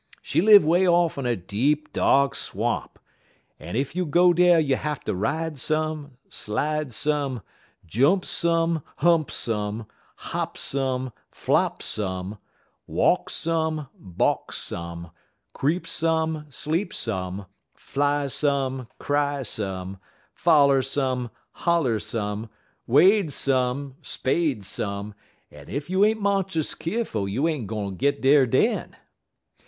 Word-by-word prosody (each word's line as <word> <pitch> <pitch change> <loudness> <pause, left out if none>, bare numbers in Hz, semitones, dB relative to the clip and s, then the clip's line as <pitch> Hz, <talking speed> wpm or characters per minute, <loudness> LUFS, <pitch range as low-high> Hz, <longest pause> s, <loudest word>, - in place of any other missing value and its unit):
She - - +1
live 205 -3 +8
way 175 +4 +3
off 170 -4 +3
in 130 - -2
a 120 - +1
deep, 125 - -1
dark 140 0 +3
swamp, - - -3 0.6
en - - -7
ef 135 +5 -2
you 180 -2 -1
go 175 +4 +5
dar 175 0 +5
you 140 -4 +2
hatter 150 +1 -3
ride 150 - -2
some, 155 -2 -2
slide 150 +6 -2
some; 140 -3 -1 0.4
jump 140 - +2
some, 165 -1 +1 0.2
hump 165 -2 +3
some; 105 0 -2 0.3
hop - - -4
some, 130 -2 -1 0.2
flop - - 0
some; 95 0 -3 0.5
walk - - +2
some, 160 -3 -1
balk 90 -3 -1
some; 85 0 -5 0.4
creep 160 +7 0
some, 160 -1 0
sleep 160 +8 -2
some; 95 -2 -3 0.3
fly 145 0 0
some, 135 -3 -1
cry 145 -1 0
some; 95 -4 -4 0.3
foller 140 -5 +4
some, 130 -2 -1 0.2
holler 160 -10 +1
some; 105 0 -3 0.4
wade 180 - +5
some, 130 0 0
spade 135 - -1
some; 100 +2 -4 0.4
en 75 -1 -13
ef 145 +4 -4
you 190 +2 +3
ain't 220 +1 +3
monst'us 195 -6 0
keerful 165 - -2
you 130 +11 0
ain't 145 -11 -2 0.3
git 140 0 +1
dar 135 0 +5
den. - - +1
140 Hz, 120 wpm, -25 LUFS, 115-160 Hz, 0.6 s, live